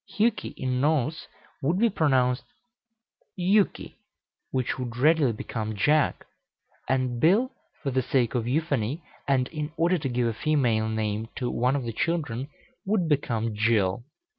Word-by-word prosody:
Hjuki, 220 0 0
in 125 -1 -1
Norse, 150 +1 0 0.3
would 160 +6 +1
be 230 +4 +4
pronounced 130 -8 +2 0.9
Juki, 195 +3 +1 0.5
which 130 0 -1
would 120 -2 -5
readily 150 -1 +4
become 110 0 -4
Jack; 150 +9 +2 0.6
and 130 -2 0
Bil, 210 - +4 0.3
for 140 - -1
the 130 0 +1
sake 125 -2 +1
of 120 -2 -1
euphony, 140 0 -1 0.2
and 130 -2 +2
in 150 -1 -4
order 175 +2 +2
to 140 -2 -2
give 120 0 0
a 115 - 0
female 115 -5 +1
name 110 0 -2
to 125 -2 -2
one 125 +3 +1
of 140 - -1
the 115 -1 -4
children, 140 -4 -1 0.4
would 195 -4 +1
become 115 -7 0
Jill. 105 -1 +1
130 Hz, 145 wpm, -26 LUFS, 115-155 Hz, 0.9 s, be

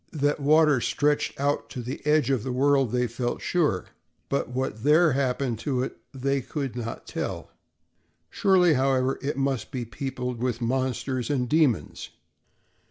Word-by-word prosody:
That 145 -1 0
water 150 -2 +4
stretched 145 +7 0
out 140 -5 0
to 125 +2 -6
the 125 +3 -5
"edge 150 -2 +3
of 130 -5 +1
the 130 - -4
world" 135 -1 +2
they 125 0 +1
felt 120 +1 -3
sure, 150 - 0 0.4
but 140 - -1
what 125 -3 -3
there 155 +3 +5
happened 130 -3 -1
to 130 -1 -1
it - - -6
they 135 +1 -1
could 135 -2 -4
not 115 -2 -5
tell. - - -5 0.8
Surely, 185 -4 +4
however, 130 -1 +1
it 140 0 -2
must 135 -2 -1
be 130 -3 -4
peopled 125 +1 -5
with 125 -2 -1
monsters 130 0 -1
and 130 -4 0
demons. 150 -5 +1
130 Hz, 155 wpm, -26 LUFS, 125-145 Hz, 0.8 s, there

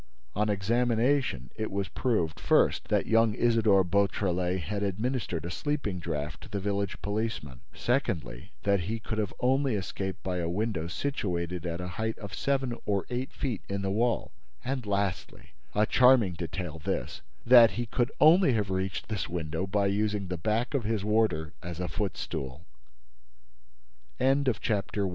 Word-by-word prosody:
On 105 +2 +1
examination, 115 - +1
it 110 0 -3
was 100 0 -2
proved, 85 - -1
first, - - +3
that - - +1
young 115 -1 +3
Isidore 110 -5 +4
Beautrelet 90 -1 +1
had 100 +6 -3
administered 100 - -2
a 85 - -4
sleeping 140 -6 -2
draught 75 -2 -4
to - - -12
the 100 - -2
village 100 -1 -2
policeman; 100 - -3 0.2
secondly, 100 - -1
that 100 -1 +3
he 105 +6 -2
could 110 0 -2 0.2
only 130 -1 +2
have 100 - 0
escaped 95 +1 -5
by 90 -1 -2
a 85 -1 -1
window 95 -3 -1
situated 90 - -2
at 85 0 -3
a 90 - -4
height 110 0 -1
of 100 -2 -8
seven 135 -3 0
or 100 -2 +1
eight 125 +2 -2
feet 125 -8 -3
in 100 0 -2
the 95 - 0
wall; 115 +4 0 0.3
and 130 -3 -2
lastly—a 100 +1 -2
charming 125 -6 +5
detail, 85 -1 -5
this—that 115 - +3
he 120 - -1
could 120 +1 0
only 160 -1 +6
have 105 -3 0
reached 95 0 -2
this 105 -5 -3
window 85 +1 -3
by 100 +1 +1
using 100 -1 0
the 90 - -1
back 110 - -1
of 135 -4 0
his 105 -1 -1
warder 105 -8 +1
as 85 -1 -6
a 90 - -2
footst 95 +2 -3
100 Hz, 150 wpm, -29 LUFS, 90-115 Hz, 0.3 s, only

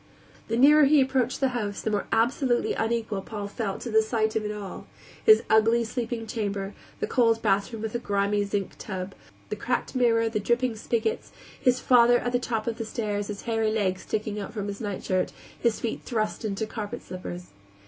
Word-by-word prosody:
The 230 - -1
nearer 295 +4 +7
he 295 +1 +5
approached 260 -1 +1
the 270 - +3
house, 210 -5 -3
the 220 - -2
more 205 -1 -1
absolutely 240 +2 +2
unequal 225 -3 -1
Paul 205 +1 -6
felt 200 -1 -4
to 235 - -5
the 220 0 +5
sight 220 -1 0
of 220 - +1
it 210 - -2
all: 205 -2 -7 0.4
his 435 -1 +7
ugly 225 +2 +4
sleeping 230 0 -3
chamber; 200 -3 -3 0.3
the 435 - 0
cold 230 - +2
bathroom 210 +2 0
with 220 - -3
the 240 - -1
grimy 205 -2 +1
zinc 200 -1 -2
tub, 190 -1 -5 0.4
the - - -2
cracked 245 +4 -2
mirror, 230 -3 +3
the 220 -1 -1
dripping 240 +3 +1
spiggots; 220 0 -1 0.3
his 250 0 +3
father, 245 -1 +6
at 245 - -2
the 245 - +2
top 225 -3 -2
of 235 0 -3
the 225 - -2
stairs, 210 -2 -2
his 205 -1 -6
hairy 225 -2 +1
legs 190 -4 0
sticking 210 -1 -3
out 200 - -6
from 205 -1 -3
his 200 +2 -6
nightshirt, 190 -3 -1 0.3
his 235 -2 +1
feet 230 - -3
thrust 220 -2 -2
into 215 0 -2
carpet 215 +2 -6
slippers. 180 -1 -7
220 Hz, 195 wpm, -26 LUFS, 205-240 Hz, 0.4 s, nearer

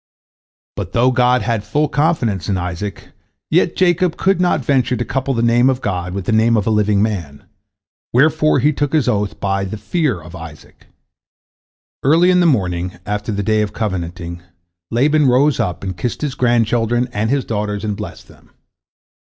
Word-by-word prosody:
But - - -5
though 125 +2 +3
God 125 -1 +2
had 110 -1 -1
full 150 +5 0
confidence 145 - 0
in 95 - +1
Isaac, 90 +3 -5 0.4
yet - - +2
Jacob 180 -1 +2
could 190 -1 +1
not 165 -7 +1
venture 130 -2 +2
to 120 - -2
couple 135 +2 -2
the 115 - 0
name 120 +2 +4
of 130 -1 0
God 90 -5 -3
with 100 -2 -4
the - - -1
name 110 +1 +3
of 105 - 0
a 110 - +1
living 105 -1 +2
man, 85 -10 -4 0.7
wherefore 155 +4 +3
he 150 +1 +3
took 145 +1 -2
his 150 -6 +2
oath 105 -3 -1
by 95 0 -1
"the 100 +3 -5
Fear 110 - -1
of 85 +3 -12
Isaac." 80 -3 -12 1.1
Early 165 +6 +4
in 180 - +4
the 175 - +4
morning 90 - 0
after 105 +1 -3
the 100 0 -2
day 110 +1 +2
of 105 - -2
covenanting, 85 -4 -4 0.5
Laban 145 +5 +2
rose 135 +4 +3
up, 90 +1 -2
and 95 -2 -4
kissed 115 - -4
his 145 -3 -2
grandchildren 120 -1 +1
and 105 +2 -1
his 135 0 0
daughters, 105 -2 -3
and 105 -2 -2
blessed - - -8
them. - - -20
115 Hz, 180 wpm, -18 LUFS, 100-135 Hz, 1.1 s, name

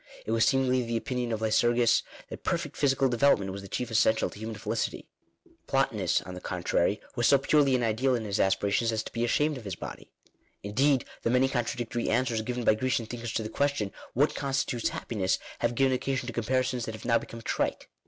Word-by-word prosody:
It - - -3
was 115 -1 +3
seemingly 130 -1 +2
the 115 -1 -2
opinion 125 0 -2
of 110 -1 -2
Lycurgus 120 +2 +3 0.3
that - - -8
perfect - - -2
phy 145 - +2
sical 135 0 +3
development 120 -6 +3
was 100 +1 -6
the 100 - -9
chief 120 +4 -3
essential 110 0 +3
to - - -12
human 110 0 -5
felicity; 105 - -3 0.6
Plotinus, - - +1
on 90 - -8
the 90 - -8
contrary, 90 +2 0 0.2
was 120 -2 +2
so 140 - +6
purely 135 -1 +3
ideal 120 +4 +2
in 115 -2 -3
his 100 -1 -2
aspirations 100 +4 +2
as 110 -1 -1
to - - -9
be 115 - -1
ashamed 145 +4 +1
of - - -12
his 100 -3 -4
body. - - -8 0.5
Indeed 130 +6 +2 0.2
the - - 0
many 125 +2 +4
con 120 -3 -1
tradictory 120 0 -3
answers 120 -3 +1
given 125 +2 -3
by 110 - +5
Grecian 120 +1 0
thinkers 120 0 -6
to 110 - -1
the 110 - -5
ques 140 +4 +1
tion 105 -6 -2
— - - -23
What 145 +5 +3
constitutes 135 -4 -1
happiness? 95 -5 -1 0.2
have 120 0 0
given 135 +1 +3
occasion 130 0 -1
to 120 - -5
comparisons 125 +1 0
that 110 - -5
have 110 - -11
now 115 -1 +3
become 115 0 -10
trite. - - -1
120 Hz, 215 wpm, -28 LUFS, 110-130 Hz, 0.6 s, so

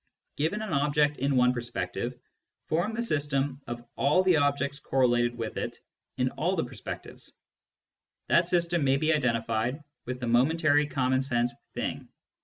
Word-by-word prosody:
Given 180 +9 -1
an 205 -6 -4
object 145 +1 +2
in 140 +1 0
one 125 0 +4
perspective, 120 -1 -4 0.5
form 175 +8 0
the 235 - -1
system 145 - -1
of 120 0 -6
all 150 +7 +3
the 185 -3 +4
objects 140 -1 +1
correlated 120 -3 +2
with 115 -2 -4
it - - -3 0.4
in - - +1
all - - 0
the - - 0
perspectives; - - -8 1.0
that 170 0 +4
system 170 -2 +1
may 135 0 +3
be 155 +3 +2
identified 120 0 0 0.2
with 125 0 -4
the 125 - -3
momentary 145 +5 +3
common 130 -2 +1
sense 120 -2 0 0.2
"thing." - - -3
140 Hz, 150 wpm, -28 LUFS, 125-155 Hz, 1.0 s, one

